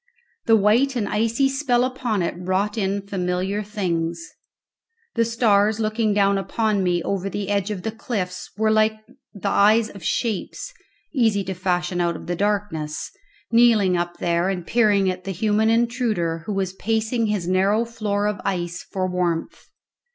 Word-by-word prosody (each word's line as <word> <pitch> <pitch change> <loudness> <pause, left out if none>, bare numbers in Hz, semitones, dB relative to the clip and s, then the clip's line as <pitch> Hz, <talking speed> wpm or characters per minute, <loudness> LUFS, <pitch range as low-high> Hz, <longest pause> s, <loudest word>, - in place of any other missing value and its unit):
The 225 - +6
white 225 +6 +3
and 220 -4 -1
icy 230 +6 +1
spell 270 -3 +1
upon 250 -6 -1
it 170 - -1
wrought 185 +4 -1
in 200 -2 -1
familiar 190 +1 -1
things. 170 -5 -3 0.8
The 230 - +2
stars 220 -2 +2
looking 215 0 0
down 200 -1 +3
upon 215 0 0
me 175 -2 +1
over 195 0 -2
the 200 0 -4
edge 200 0 0
of 195 -4 -4
the 220 - -2
cliffs 195 -5 -4
were 220 0 +2
like 215 0 +3 0.4
the 200 0 -4
eyes 215 +3 +4
of 200 -4 -12
shapes 230 - -2 0.4
(easy 225 -7 +2
to 190 - -4
fashion 180 -1 -1
out 170 -1 0
of - - -9
the 175 - -2
darkness) 195 -6 -2 0.4
kneeling 230 -6 +5
up 175 0 -2
there 170 +2 +1
and 180 -3 -3
peering 205 -3 +3
at 185 0 -2
the 195 - -6
human 215 +3 +1
intruder 225 -8 +1
who 210 - -1
was 190 -1 -1
pacing 225 +3 0
his 205 -5 -1
narrow 195 +5 +2
floor 210 -3 -2
of 210 0 -1
ice 175 -2 -2
for 185 -1 -3
warmth. 180 -2 -2
205 Hz, 165 wpm, -23 LUFS, 185-220 Hz, 0.8 s, The